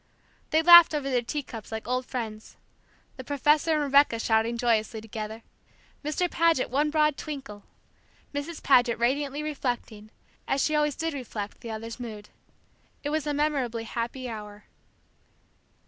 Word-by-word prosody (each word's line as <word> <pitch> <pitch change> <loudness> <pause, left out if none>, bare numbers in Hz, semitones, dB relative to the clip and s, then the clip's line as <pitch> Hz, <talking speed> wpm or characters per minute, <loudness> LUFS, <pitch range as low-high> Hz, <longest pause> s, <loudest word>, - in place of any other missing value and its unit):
They 315 +1 +2
laughed 345 -2 +9
over 275 -2 -2
their 250 -1 +2
teacups 235 -4 -6
like 220 0 -5
old 255 +1 -1
friends; 220 -4 -6 0.6
the 260 - -7
professor 295 +4 +2
and 305 -1 +1
Rebecca 280 -4 +4
shouting 225 +1 +1
joyously 225 -1 +1
together, 220 0 -7 0.6
Mr. 310 +5 0
Paget 330 -7 +1
one 290 +3 +2
broad 300 -1 +2
twinkle, 270 -9 -7 0.7
Mrs. 290 +3 -5
Paget 245 -3 +4
radiantly 280 +5 0
reflecting, 245 -7 -4 0.4
as 270 0 +1
she 310 - 0
always 300 -2 +1
did 325 -1 -2
react, 220 -6 -6
the 235 - -7
others' 225 +2 -6
mood. 215 -4 -8 0.7
It 290 - -2
was 310 -1 -1
a 295 - 0
memorably 270 -6 -1
happy 235 +3 -4
hour. 210 -2 -8
255 Hz, 145 wpm, -27 LUFS, 225-295 Hz, 0.7 s, laughed